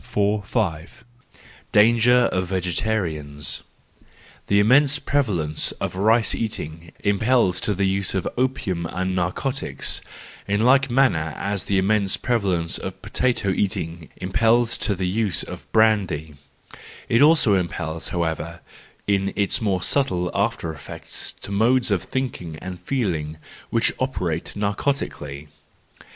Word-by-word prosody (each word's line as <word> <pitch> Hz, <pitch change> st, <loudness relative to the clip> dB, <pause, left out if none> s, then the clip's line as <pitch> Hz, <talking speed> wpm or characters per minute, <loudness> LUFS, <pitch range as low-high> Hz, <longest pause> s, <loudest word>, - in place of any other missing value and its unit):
145 100 Hz, 0 st, -1 dB, 0.7 s
Danger 120 Hz, +3 st, +5 dB
of 95 Hz, -1 st, -1 dB
Vegetarians. 85 Hz, -5 st, -2 dB, 0.4 s
— -, -, -26 dB
The 100 Hz, -, +4 dB
immense 135 Hz, +7 st, +5 dB
pre¬ 145 Hz, 0 st, +1 dB
valence 80 Hz, -, -1 dB
of -, -, -4 dB
rice 110 Hz, +4 st, +3 dB
eating 85 Hz, -7 st, -5 dB
impels 100 Hz, -2 st, +2 dB
to 105 Hz, -, 0 dB
the 100 Hz, +1 st, +1 dB
use 95 Hz, 0 st, 0 dB
of 95 Hz, -, -1 dB
opium 100 Hz, -10 st, -1 dB
and 95 Hz, +2 st, -2 dB
narcotics, 95 Hz, +10 st, -2 dB, 0.5 s
in 100 Hz, +1 st, +1 dB
like 135 Hz, +2 st, +5 dB
manner 120 Hz, -, +2 dB
as 100 Hz, -1 st, -2 dB
the 100 Hz, -, +1 dB
immense 100 Hz, 0 st, +2 dB
prevalence 95 Hz, -9 st, 0 dB
of 95 Hz, 0 st, -6 dB
potato 125 Hz, -5 st, 0 dB
eating 85 Hz, -4 st, -2 dB
impels 115 Hz, +5 st, +2 dB
to 100 Hz, -, 0 dB
the 95 Hz, 0 st, -2 dB
use 105 Hz, 0 st, 0 dB
of -, -, -10 dB
brandy:—it 95 Hz, -, -1 dB
also 150 Hz, -8 st, +5 dB
impels, 80 Hz, -3 st, -2 dB
however, 85 Hz, -1 st, -3 dB, 0.4 s
in 100 Hz, -1 st, +1 dB
its 100 Hz, +4 st, +1 dB
more 95 Hz, -4 st, 0 dB
subtle 90 Hz, -11 st, 0 dB
after 100 Hz, -6 st, -1 dB
effects 70 Hz, -1 st, -6 dB
to -, -, -10 dB
modes 115 Hz, +4 st, +3 dB
of 100 Hz, -, +2 dB
thought 130 Hz, -5 st, -3 dB
and 90 Hz, +2 st, -7 dB
feeling 85 Hz, -, -2 dB, 0.3 s
which 115 Hz, 0 st, +2 dB
operate 90 Hz, -, -2 dB
narcotically. 100 Hz, -, -2 dB
100 Hz, 125 wpm, -23 LUFS, 85-115 Hz, 0.7 s, Danger